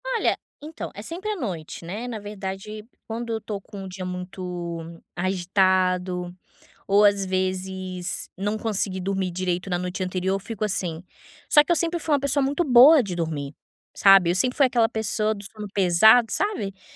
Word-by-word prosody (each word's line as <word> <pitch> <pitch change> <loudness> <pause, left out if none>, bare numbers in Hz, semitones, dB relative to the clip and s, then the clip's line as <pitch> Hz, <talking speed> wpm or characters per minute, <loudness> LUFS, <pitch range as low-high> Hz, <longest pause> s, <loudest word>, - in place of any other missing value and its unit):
Olha, - - +1 0.3
então, 310 +2 -7
é 205 - -7
sempre 345 - -6
à - - -2
noite, 175 - -6
né. 210 +8 -5
Na 230 -3 -5
verdade, 205 +1 -6 0.2
quando 230 +1 -4
eu 225 - 0
estou 210 -2 -6
com 200 -1 -9
um - - -7
dia 185 0 -7
muito 180 -2 -6 0.2
agitado 185 -1 +1 0.5
ou, 200 +1 +5
às 200 -1 +4
vezes, 185 -1 -3
não 205 +3 -1
consegui 205 -4 -2
dormir 190 -1 -1
direito 180 +1 -2
na 175 - 0
noite 180 +1 -3
anterior 185 +1 -1
eu - - -2
fico 215 +1 -6
assim. 180 -4 -3 0.5
Só 295 - +7
que 325 - -3
eu - - +5
sempre 340 +1 0
fui 315 - -1
uma 285 - +3
pessoa 280 0 +1
muito 285 +6 0
boa 275 +2 +8
de 195 -6 -5
dormir, 155 -4 -3 0.4
sabe, 195 -3 +6
eu - - -1
sempre 250 +7 +1
fui 280 - +6
aquela 235 -2 +2
pessoa 220 0 -1
do 200 - -9
sono 210 +1 -8
pesado, 200 +5 +6
sabe? 400 - -1
Para 190 - -31
195 Hz, 185 wpm, -24 LUFS, 180-225 Hz, 0.5 s, boa